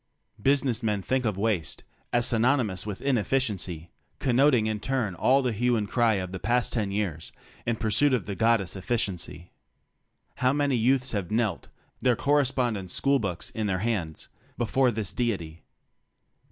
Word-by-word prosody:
Business 135 -2 +1
men 105 -4 -1
think 130 +3 0
of 105 -4 -1
waste 100 -6 -1 0.3
as 120 0 +2
synonymous 115 -5 +1
with 100 -2 -5
"ineffi 135 -2 +1
ciency," 95 -9 -3 0.3
connoting 130 -2 +3
in 110 -1 -1
turn 125 -4 -1
all 130 +10 +3
the 125 - +1
hue 120 +3 +1
and 105 -2 -2
cry 115 -1 +2
of 95 -2 -3
the 95 - -5
past 120 +3 0
ten 110 -4 0
years 100 -6 -3 0.4
in 120 - +1
pursuit 110 +6 +2
of 125 -7 0
the 100 - -4
goddess 110 -3 +1
efficiency. 95 -5 -3 0.9
How 130 +1 +2
many 145 -2 +1
youths 130 +3 +2
have 100 -5 -3
knelt 110 -1 -1 0.2
— - - -40
their 125 -2 +3
correspondence 125 -9 +1
school 140 0 +2
books 95 -6 -4
in 110 -1 -2
their 95 -2 0
hands 90 -10 -2 0.2
— - - -33
before 125 +2 +2
this 110 -5 -3
deity. 85 -10 -2
110 Hz, 165 wpm, -27 LUFS, 100-125 Hz, 0.9 s, connoting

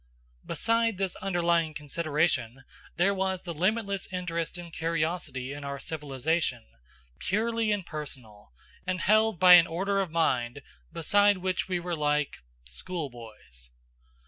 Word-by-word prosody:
Beside 230 -2 +1
this 190 -2 -1
underlying 170 -4 +1
consideration 150 -4 -1 0.3
there 190 +4 +3
was 190 -1 -1
the 170 - -5
limitless 200 +3 -1
interest 175 -2 -3
and 170 -2 -9
curiosity 160 -5 -2
in 145 0 -7
our 140 0 -4
civilization, 145 -3 -1 0.5
purely 225 +2 0
impersonal, 140 - -5 0.4
and 185 -1 -1
held 215 -1 +3
by 180 -1 +9
an 170 -2 +9
order 195 +4 0
of 190 - -2
mind 135 -5 0 0.3
beside 205 +5 +3
which 185 0 -1
we 180 -2 -1
were 175 0 -3
like 150 -1 0 0.3
schoolboys. 110 - -7
170 Hz, 120 wpm, -28 LUFS, 145-190 Hz, 0.5 s, by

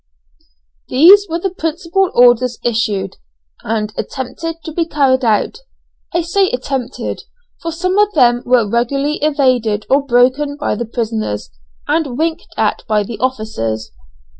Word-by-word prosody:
These 385 +10 +7
were 330 - -1
the 375 +2 -2
principal 345 +3 -1
orders 245 0 +4
issued, 215 -5 -1 0.4
and 215 -1 -2
attempted 295 +6 -5
to 320 - -6
be 330 +1 -1
carried 270 -4 +2
out. 225 - +1 0.5
I 345 - +1
say 380 +3 +1
attempted, 255 0 -4 0.4
for 330 - -3
some 365 +4 0
of 415 0 +3
them 245 -4 +4
were 245 -3 +3
regularly 275 +7 0
evaded 255 -8 +1
or 275 +1 +4
broken 275 +3 +2
by 295 - -1
the 235 +3 -3
prisoners, 220 - -3 0.4
and 285 -7 0
winked 325 +1 -1
at - - 0
by 215 -2 +2
the 225 +2 -7
officers. 215 - -3
260 Hz, 140 wpm, -16 LUFS, 230-320 Hz, 0.5 s, These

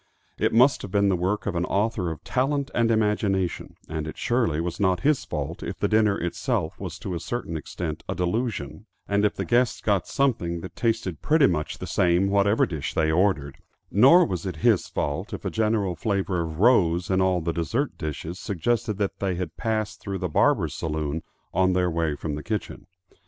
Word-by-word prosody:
It - - +2
must 125 +5 +4
have - - -6
been 100 +1 +2
the 95 - +3
work 95 +4 -1
of 100 - -1
an 85 0 0
author 100 -3 0
of 80 - -7
talent 140 +2 0
and 115 -1 +2
imagination, 105 -4 0
and 80 -1 -4
it 80 - -7
surely 115 -11 +1
was 85 +1 -3
not 95 -3 +2
his 145 0 +2
fault - - -4
if - - -5
the - - +1
dinner 110 -2 +3
itself 85 +1 -2
was 90 -3 -6
to 95 - -5
a 85 - -2
certain 120 -7 -4
extent 80 +1 -5
a - - -1
delusion, 90 - -2 0.2
and 100 0 +1
if 105 - +2
the - - -3
guests 120 -1 +2
got 100 -6 0
something 90 -12 0
that 95 - -9
tasted 115 -8 -1
pretty 155 -2 +4
much 75 - -1
the - - -6
same 90 +2 +2
whatever 100 +2 +3
dish 80 -6 -4
they 80 0 +2
ordered; 80 -6 +1 0.3
nor 135 - +7
was 90 -5 -3
it 95 -4 -4
his - - +4
fault 70 0 -3
if - - -6
a - - -1
general 105 -4 0
flavor 95 -1 -1
of 80 -2 -4
rose 90 -5 +3
in 95 0 +3
all 95 -1 +2
the 85 0 -2
dessert 115 - -1
dishes 80 +3 -5
suggested 110 +3 -1
that 100 -2 -2
they 95 -2 -1
had 85 -3 -4
passed 110 -2 -2
through 100 -1 -4
the 90 - -2
barber's 90 - +2
saloon 75 0 -3 0.3
on 95 +1 +3
their 90 -1 +1
way 80 -2 0
from 75 +1 -4
the 75 - -4
kitchen. 105 +4 -4
95 Hz, 200 wpm, -25 LUFS, 85-110 Hz, 0.3 s, nor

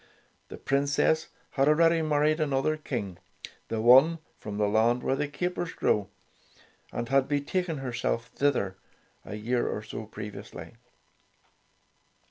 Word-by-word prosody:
The - - -9
Princess 140 +4 +1 0.2
had 135 0 +2
already 165 +2 +4
married 155 0 +2
another 145 0 +1
King, 110 - -5 0.5
the 115 - -2
one 135 +8 +7 0.2
from 105 -1 -6
the 105 -1 +2
land 115 +4 +2
where 135 - +1
the 150 - -1
capers 175 +2 -3
grow, 105 -2 +1 0.8
and 120 - -3
had 135 -1 +3
be 145 0 +1
taken 170 +2 -2
herself 120 -3 -2
thither, 125 -10 0 0.5
a 105 - -7
year 120 +3 -1
or 105 - -3
so 110 0 -7
previously. 105 -1 -8
135 Hz, 130 wpm, -28 LUFS, 110-155 Hz, 0.8 s, one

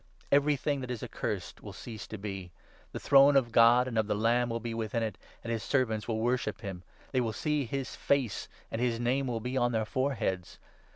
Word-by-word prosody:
' - - -33
Every 145 +1 +4
thing 140 0 -1
that 125 - -6
is 125 -3 -4
accursed - - -4
will - - -9
cease 110 -4 -8
to 110 - -6
3 - - -14
be.' 95 -4 -5 0.4
The - - -5
throne 140 +1 +6
of 125 -4 +3
God 120 +2 +6
and 115 -3 0
of 110 - +1
the 105 - 0
Lamb 120 +3 +2
will 115 0 -2
be 115 0 -4
within 115 0 -2
it, 110 -3 -2 0.3
and 115 - -2
his 115 - -2
servants 110 -6 0
will 115 -2 -1
worship 115 -1 -1
him; 95 -5 -6 0.3
they 130 - +2
will 115 -2 -1
see 150 +1 0
his 135 +2 -4
face, 135 -7 0 0.2
and 115 - -2
4 - - +3
his 115 -1 -3
name 130 +3 +1
will 120 -2 -1
be 125 +3 -2
on 120 -1 +2
their 110 -1 +1
foreheads. 115 -8 -2
120 Hz, 235 wpm, -30 LUFS, 110-130 Hz, 0.4 s, throne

